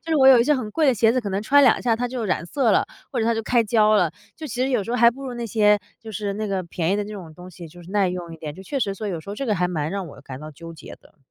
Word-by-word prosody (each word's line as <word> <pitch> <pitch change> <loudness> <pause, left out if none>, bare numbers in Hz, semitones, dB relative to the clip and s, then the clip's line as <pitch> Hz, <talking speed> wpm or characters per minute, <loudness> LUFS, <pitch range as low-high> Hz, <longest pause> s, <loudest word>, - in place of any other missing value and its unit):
就 330 - -7
是 - - +3
我 265 -2 +5
有 260 -2 +8
一 235 - +4
些 300 - +3
很 240 -6 -4
贵 310 +8 +1
的 265 - +4
鞋 225 +1 +3
子， 255 - +1
可 215 - -5
能 195 +2 -2
穿 285 +6 +5
两 250 - +5
下 235 -2 +2
它 245 +2 -1
就 245 -2 -4
染 185 -5 -1
色 245 +5 +1
了， - - +3 0.3
或 255 - -3
者 220 - +1
它 230 - +2
就 225 - -2
开 235 +1 +2
胶 215 0 +3
了。 180 -6 +3 0.3
就 315 - -7
其 245 - -7
实 265 - +1
有 245 -5 +1
时 230 - -6
候 245 - 0
还 235 -1 +6
不 265 +3 -11
如 250 - -5
那 240 -1 -4
些 210 -1 +3 0.2
就 225 - -9
是 205 +1 -3
那 215 +1 -3
个 195 -2 -2
便 170 0 -2
宜 - - +1
的 210 - -1
那 210 - -8
种 175 -6 -9
东 180 +3 -12
西 175 -1 -10
就 175 +2 -14
是 175 - -13
耐 200 -2 +2
用 180 -2 -5
一 - - -11
点， 150 -2 -6
就 190 - -11
确 275 +8 -3
实 200 -4 -1
说 210 +2 -6
有 175 -4 -4
时 180 - -16
候 200 - -4
这 275 - -4
个 215 - +1
还 180 -1 +1
蛮 155 -3 -2
让 195 -1 -4
我 145 - -12
感 130 -1 -9
到 155 0 -8
纠 165 +3 -11
结 155 -3 -11
的。 - - -23
210 Hz, 395 characters per minute, -23 LUFS, 180-240 Hz, 0.3 s, 有